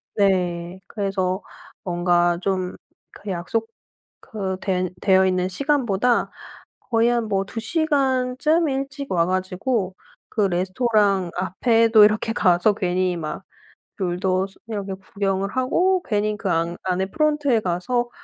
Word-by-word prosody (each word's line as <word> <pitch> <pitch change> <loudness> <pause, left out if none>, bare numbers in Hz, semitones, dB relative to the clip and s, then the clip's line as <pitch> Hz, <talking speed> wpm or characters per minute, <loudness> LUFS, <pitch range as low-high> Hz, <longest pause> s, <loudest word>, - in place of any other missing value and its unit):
네. 180 -3 0
그래서 195 -2 -2 0.4
뭔가 175 -1 +2
좀 185 -1 -1 0.4
그 205 - -9
약속 195 +5 -2 0.5
그 190 -3 -4
된 185 -2 -1
되어 190 -1 +4
있는 185 -1 +1
시간보다 245 -2 +1 0.5
거의 230 -1 +1
한 235 -2 0
뭐 195 -1 0
2 225 - -6
시간쯤 280 +2 +1
일찍 275 +1 -4
와 170 -2 +3
가지고 185 +2 -1 0.3
그 215 - -1
레스토랑 195 +1 +1
앞에도 225 +4 +4
이렇게 215 +1 +1
가서 180 -1 +3
괜히 185 -2 0
막 155 -2 -5 0.6
욜도스 185 +1 -1
이렇게 200 -3 -4
구경을 195 0 -2
하고 355 +9 +2
괜히 210 -1 -1
그 200 - -3
안 170 0 0
안에 185 0 0
프론트에 295 -1 +1
가서 215 +7 -1
195 Hz, 235 characters per minute, -22 LUFS, 185-240 Hz, 0.6 s, 되어